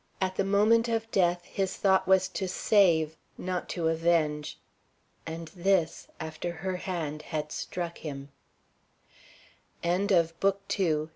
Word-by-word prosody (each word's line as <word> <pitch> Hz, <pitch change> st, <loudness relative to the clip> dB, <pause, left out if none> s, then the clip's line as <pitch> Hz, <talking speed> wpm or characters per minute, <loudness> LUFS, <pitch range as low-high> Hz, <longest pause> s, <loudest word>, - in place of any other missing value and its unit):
At 185 Hz, -1 st, -1 dB
the 195 Hz, -, +1 dB
moment 215 Hz, +4 st, +4 dB
of 225 Hz, 0 st, -1 dB
death 175 Hz, -2 st, +2 dB
his 195 Hz, -1 st, -2 dB
thought 190 Hz, -1 st, +3 dB
was 190 Hz, 0 st, +4 dB
to 190 Hz, -, -3 dB
save, 170 Hz, -5 st, +3 dB, 0.2 s
not 180 Hz, -1 st, -3 dB
to 170 Hz, -3 st, -1 dB
avenge. 160 Hz, -2 st, +1 dB, 0.7 s
And 165 Hz, 0 st, -6 dB
this 185 Hz, -2 st, 0 dB
after 160 Hz, +2 st, -4 dB
her 180 Hz, +2 st, -3 dB
hand 160 Hz, -5 st, -4 dB
had 150 Hz, -1 st, -4 dB
struck 170 Hz, -1 st, -4 dB
him. 140 Hz, -2 st, -7 dB, 1.5 s
CHAPTER 180 Hz, +4 st, +1 dB
VI. 195 Hz, -3 st, +5 dB
ANSWERED. 170 Hz, -2 st, 0 dB
175 Hz, 130 wpm, -29 LUFS, 160-195 Hz, 1.5 s, VI